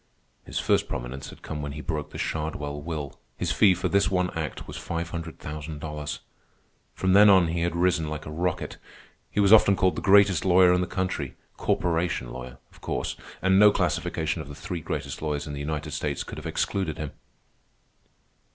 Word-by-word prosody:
His - - -5
first - - +2
prominence 65 +3 -5
had - - -14
come 75 -1 -5
when 70 -1 -4
he 75 - -6
broke 75 -1 -3
the - - -9
Shardwell 75 -2 -3
will. 75 -3 -5 0.2
His - - -1
fee 95 -3 +5
for - - -1
this 100 0 +3
one 90 -1 +1
act 80 -2 -4
was - - -8
five 85 0 -4
hundred 85 -1 -5
thousand 75 0 -6
dollars. 75 -1 -5 0.7
From 95 0 +1
then 105 +1 +8
on 95 -4 +6
he 85 +1 -1
had 85 0 0
risen 85 -3 +2
like 75 0 -5
a 75 - -7
rocket. 85 +2 -2 0.5
He - - -2
was 100 +1 +6
often 100 -2 +7
called 95 -1 +2
the - - -3
greatest 100 -3 +5
lawyer 90 -1 +6
in 90 - +2
the 90 - -1
country—corporation 85 -5 -2
lawyer, 65 +1 -8
of - - -20
course; - - -2 0.3
and 95 +1 +5
no 105 0 +9
classification 85 -2 -1
of 75 - -9
the 75 - -8
three 85 +2 -5
greatest - - -4
lawyers 75 -2 -2
in 75 - -6
the 70 - -5
United 75 +1 -3
States 75 -2 -2
could - - -8
have - - -7
excluded 95 -6 -1
him. 75 -2 -4
80 Hz, 195 wpm, -26 LUFS, 75-90 Hz, 0.7 s, no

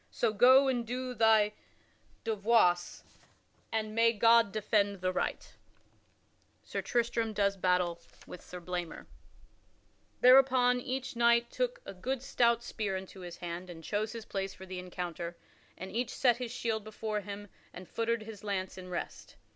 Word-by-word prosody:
So 230 -3 0
go 260 +5 +6
and 250 -3 0
do 250 +2 -4
thy 220 -3 +4 0.7
devoirs, 210 -5 +2 0.7
and 215 -1 -2
may 230 +1 +4
God 230 -1 +5
defend 205 -2 +1
the 185 0 -1
right." - - -2
[Sidenote: - - -19 1.1
Sir - - -4
Tristram 235 -2 0
does 200 -1 +1
battle 180 -2 +1 0.2
with 180 - -10
Sir 180 - -9
Blamor] 175 -1 -5 1.2
Thereupon 255 -1 +6
each 255 0 -4
knight 235 0 +3
took - - -2
a - - -7
good 250 +7 -3
stout 235 -3 +2
spear 210 -5 -3
into 190 0 -9
his 175 -2 -8
hand 175 +1 -6
and 165 -2 -10
chose 215 +5 -2
his 230 -1 -7
place 195 0 -4
for 190 - -11
the 185 -1 -6
encounter, 175 -1 -5 0.4
and 190 +1 -7
each 240 +4 -1
set 240 -3 +2
his 250 -1 -4
shield 225 -3 -2
before 215 0 -4
him 205 +1 -8 0.2
and 180 0 -10
feutered 230 -1 -1
his 215 -2 -10
lance 190 -2 -3
in 185 0 -9
rest. 175 - -6
215 Hz, 155 wpm, -31 LUFS, 185-235 Hz, 1.2 s, go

